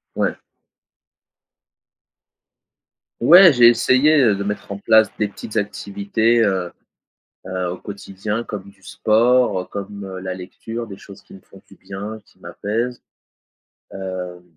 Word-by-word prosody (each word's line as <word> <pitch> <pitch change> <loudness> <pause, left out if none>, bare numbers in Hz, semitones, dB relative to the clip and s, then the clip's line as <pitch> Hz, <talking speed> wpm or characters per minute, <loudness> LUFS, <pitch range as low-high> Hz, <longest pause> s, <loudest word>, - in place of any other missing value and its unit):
Ouais. - - -1 2.8
Ouais 175 +8 +8
j'ai 120 -3 +6
essayé, 140 +5 +4
heu, 110 -5 +4
de 100 - -4
mettre 105 0 -5
en 100 - -4
place 110 +1 +4
des 105 - 0
petites 105 +2 -8
activités, 105 +3 0
heu 95 -4 -1 0.7
heu, 95 -1 -3
au 90 - -5
quotidien 100 +2 -5
comme 105 -4 -7
du 100 - -29
sport 110 -1 +1
comme, 100 0 -7
heu, 95 -1 -7
la 95 0 -4
lecture 115 +5 -7
des 95 -2 -9
choses 100 -1 -14
qui - - -16
me 95 - -15
font - - -18
du - - -17
bien, 105 +3 -8
qui - - -27
m'apaisent, 120 +4 -4 0.9
hem, 90 -2 -6
105 Hz, 135 wpm, -20 LUFS, 95-115 Hz, 2.8 s, Ouais